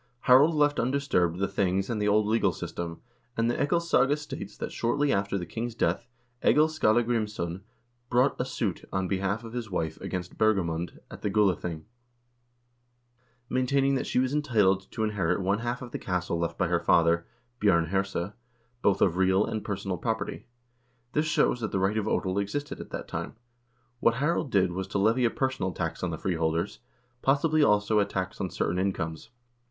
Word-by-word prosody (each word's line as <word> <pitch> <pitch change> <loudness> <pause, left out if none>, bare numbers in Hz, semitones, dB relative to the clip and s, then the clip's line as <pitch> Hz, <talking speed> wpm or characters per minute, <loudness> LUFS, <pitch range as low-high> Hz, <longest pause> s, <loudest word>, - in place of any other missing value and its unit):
Harald 140 +6 +6
left 145 -1 +3
undisturbed 120 -10 +1
the 95 +1 0
things 95 0 0
and 110 -3 -2
the 105 - +1
old 105 +1 +3
legal 110 +2 +2
system, 85 -1 -5 0.4
and 115 +1 +2
the - - -1
"Egilssaga" 165 -3 +2
states 150 - -8
that - - -4
shortly 140 +5 +1
after 100 0 0
the 90 - -4
king's 115 +7 -4
death 120 - 0 0.4
Egil 155 +1 +5
Skallagrimsson 110 - 0 0.5
brought 125 +2 +2
a - - +1
suit 115 -8 -3
on 95 -1 -1
behalf 95 +3 -1
of 115 0 -9
his 120 -3 -4
wife 80 -4 -3
against 90 -1 -5
Bergamund 90 -6 +1
at - - -10
the 105 - -1
Gulathing, 90 -6 +1 1.6
maintaining 135 +2 +2
that 135 - -1
she - - -1
was 130 +1 +2
entitled 105 -10 +2
to 110 - -2
inherit 105 -6 0
one 100 +2 +1
half 120 +3 -3
of 120 - -9
the - - -4
estate 90 -2 -2
left 85 0 -1
by - - +1
her - - +1
father, 85 0 +3 0.3
Bj0rn 85 -6 +3
Herse, 95 0 -1 0.5
both 100 -1 +3
of 90 -2 +2
real 95 +2 +3
and 110 - -3
personal 95 -2 -3
property. 110 +2 -3 0.7
This 150 +1 +1
shows 150 -4 +2
that 110 -3 -3
the - - 0
right 95 +3 +1
of 105 - -3
odel 95 -2 0
existed 145 +8 -4
at - - -10
that - - -6
time. - - -5 0.6
What 115 -1 +3
Harald 145 +2 0
did 95 -5 +2
was 95 +2 -3
to 100 - -2
levy 110 +5 +3
a - - +4
personal 130 -8 -1
tax 85 -2 -4
on 90 - -1
the 80 - -4
freeholders, 80 -6 -1 0.4
possibly, 150 +3 +3
also, 105 -4 +3
a 100 - +3
tax 95 -2 -4
on 95 - -1
certain 85 +1 -1
incomes. 90 -2 -2
105 Hz, 180 wpm, -28 LUFS, 95-125 Hz, 1.6 s, Harald